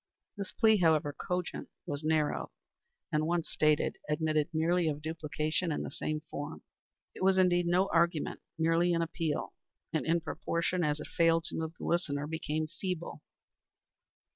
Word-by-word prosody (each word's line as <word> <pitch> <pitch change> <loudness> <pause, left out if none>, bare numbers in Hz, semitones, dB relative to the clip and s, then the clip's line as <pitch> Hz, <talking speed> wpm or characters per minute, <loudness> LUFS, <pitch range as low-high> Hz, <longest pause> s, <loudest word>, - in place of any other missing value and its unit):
This 200 -2 -5
plea, 220 -2 +5
however 160 -4 +3
cogent, 180 +3 -3 0.2
was 145 +1 -3
narrow, 155 -1 +1 0.6
and 155 0 +1
once 170 -1 0
stated 155 -1 +2
admitted 155 0 +1
merely 165 +2 +2
of 150 -1 -2
duplication 155 +1 -1
in 150 - -1
the - - -5
same 155 0 -3
form. 145 - -5 0.5
It - - -10
was 190 0 +4
indeed 175 -2 +4
no 180 +3 +3
argument, 170 -1 +2 0.2
merely 165 +2 +3
an 165 - +2
appeal, 165 -2 -2 0.4
and, - - +1
in 165 +1 +2
proportion 170 +2 -1
as 150 -1 +1
it - - -6
failed 165 -1 +3
to - - -6
move 160 0 -3
the - - -7
listener, 150 -4 0
became 155 0 -2
feeble. 170 -1 -5
165 Hz, 155 wpm, -31 LUFS, 155-175 Hz, 0.6 s, plea